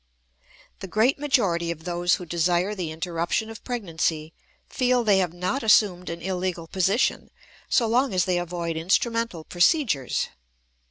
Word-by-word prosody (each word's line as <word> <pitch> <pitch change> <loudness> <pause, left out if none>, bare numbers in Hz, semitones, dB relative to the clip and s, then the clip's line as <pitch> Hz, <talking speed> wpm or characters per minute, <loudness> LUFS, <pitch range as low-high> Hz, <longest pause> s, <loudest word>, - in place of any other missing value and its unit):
_ - - -39
The 190 - -7
great 225 - +2
majority 200 -13 +1
of 165 -1 -5
those 175 0 +1
who 180 - -8
desire 175 +4 +1
the 180 -5 -4
interruption 170 +6 -2
of 225 - -11
pregnancy 165 -9 -2 0.3
feel 250 -1 +1
they 205 -3 +4
have 180 -3 0
not 180 +10 -2
assumed 200 -5 +3
an 170 0 -6
illegal 185 -2 -2
position 190 +7 0 0.4
so 240 - +3
long 245 +4 +2
as 180 -2 +1
they 180 -1 +1
avoid 170 -2 -3
instrumental 200 +2 0
procedures. 175 - +1
180 Hz, 150 wpm, -25 LUFS, 170-220 Hz, 0.4 s, they